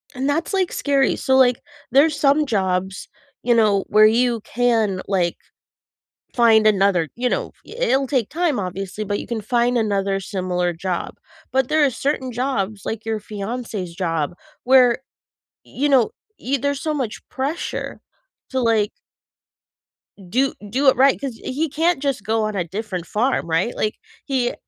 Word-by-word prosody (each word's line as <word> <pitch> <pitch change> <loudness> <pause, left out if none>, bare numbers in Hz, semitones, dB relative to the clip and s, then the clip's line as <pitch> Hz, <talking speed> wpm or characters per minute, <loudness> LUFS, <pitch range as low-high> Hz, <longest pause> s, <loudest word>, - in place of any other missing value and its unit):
And 260 +2 -2
that's, 325 +7 -1
like, 380 -2 +1
scary. 280 -2 +1
So, 265 - +1
like, 250 -2 +4 0.3
there's 290 +4 +4
some 290 +2 +3
jobs, 190 -5 -1 0.4
you 240 - +3
know, 210 -4 +3
where 215 0 +6
you 235 +1 +2
can, 225 -5 0
like, 180 -4 0 1.0
find 225 -3 +5
another 195 -6 +3
you 250 +1 -1
know, - - -2 0.2
i - - -12
i - - -8
it'll 270 +1 +2
take 255 -6 0
time, 330 -6 0
obviously, 195 +2 -4
but 205 0 -2
you - - -6
can 230 -2 -3
find 240 +3 +1
another 200 -3 0
similar 180 -2 -2
job. 175 +1 -4 0.4
But 265 -1 +1
there 310 0 +3
are - - +3
certain 265 0 -2
jobs, 220 -5 -2
like 220 0 -4
your 220 -1 -1
fiancé's 210 -3 -5
job 165 -3 -2 0.3
where, 250 -1 +5 0.6
you 285 +3 -2
know, 260 -5 +4 0.3
y 275 +3 0
there's 285 -1 -1
so 310 -2 -1
much 260 -7 -3
pressure 275 +5 -4 0.5
to, 260 - 0
like 225 -3 +2 1.4
do 260 +6 +1 0.2
do 265 +6 +1
it - - +3
right, 270 +2 +4
'cause 270 -5 -5
he 300 +5 -2
can't 320 +1 +1
just 275 -7 -1
go 220 +2 0
on 215 -1 -2
a 185 - 0
different 185 0 -5
farm, 240 0 0
right? 170 +9 0
Like, 215 - -1 0.3
he 255 -3 0
230 Hz, 165 wpm, -21 LUFS, 200-265 Hz, 1.4 s, where